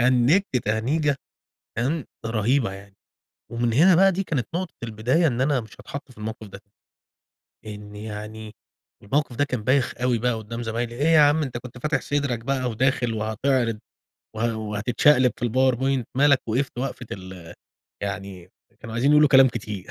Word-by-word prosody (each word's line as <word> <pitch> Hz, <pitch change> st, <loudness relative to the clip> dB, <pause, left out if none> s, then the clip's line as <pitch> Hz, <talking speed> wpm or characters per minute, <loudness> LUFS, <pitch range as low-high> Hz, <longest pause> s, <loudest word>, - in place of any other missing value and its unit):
هنجت 130 Hz, +7 st, +3 dB
تهنيجة 135 Hz, +7 st, +1 dB, 0.6 s
تمام، 140 Hz, +5 st, -1 dB, 0.2 s
رهيبة 115 Hz, +1 st, +1 dB
يعني، 100 Hz, 0 st, -12 dB, 0.6 s
ومن 115 Hz, 0 st, 0 dB
هنا 170 Hz, +10 st, +6 dB
بقى 195 Hz, +3 st, +5 dB
دي 195 Hz, +2 st, -2 dB
كانت 135 Hz, -9 st, -2 dB
نقطة 180 Hz, -1 st, -3 dB
البداية 120 Hz, +9 st, +1 dB
إن 125 Hz, -3 st, 0 dB
أنا 135 Hz, -1 st, +2 dB
مش 110 Hz, -1 st, -12 dB
هاتحط 140 Hz, -2 st, -8 dB
في 110 Hz, -, -20 dB
الموقف 110 Hz, 0 st, -6 dB
ده 100 Hz, +1 st, -11 dB, 1.1 s
إن 105 Hz, -1 st, -9 dB
يعني 105 Hz, 0 st, -8 dB, 0.5 s
الموقف 135 Hz, +3 st, -1 dB
ده 145 Hz, -, +2 dB
كان 125 Hz, -6 st, -4 dB
بايخ 130 Hz, +1 st, +2 dB
أوي 125 Hz, -2 st, +2 dB
بقى 125 Hz, +1 st, 0 dB
قُدّام 115 Hz, +2 st, -6 dB
زمايلي، 115 Hz, +1 st, -3 dB
إيه 145 Hz, +5 st, 0 dB
يا 165 Hz, -1 st, +6 dB
عم 150 Hz, +2 st, +4 dB
أنت 125 Hz, -3 st, -4 dB
كنت 125 Hz, 0 st, -10 dB
فاتح 140 Hz, +1 st, -1 dB
صدرك 140 Hz, -4 st, -1 dB
بقى 130 Hz, +1 st, -1 dB
وداخل 120 Hz, 0 st, 0 dB
وهتعرض، 110 Hz, +1 st, 0 dB, 0.6 s
وه 115 Hz, 0 st, -1 dB
وهتتشقلِب 115 Hz, +5 st, +2 dB
في 120 Hz, -, -2 dB
الpowerpoint 130 Hz, +1 st, +1 dB
مالك 140 Hz, -1 st, +5 dB
وقِفْت 125 Hz, +3 st, -1 dB
وقفة 130 Hz, -1 st, -4 dB
ال 90 Hz, -3 st, -9 dB, 0.5 s
يعني 95 Hz, -3 st, -5 dB, 0.3 s
كانوا 115 Hz, 0 st, -8 dB
عايزين 130 Hz, +5 st, +2 dB
يقولوا 150 Hz, 0 st, +6 dB
كلام 135 Hz, -1 st, +7 dB
كتير. 105 Hz, -5 st, -6 dB
120 Hz, 160 wpm, -24 LUFS, 110-140 Hz, 1.1 s, كلام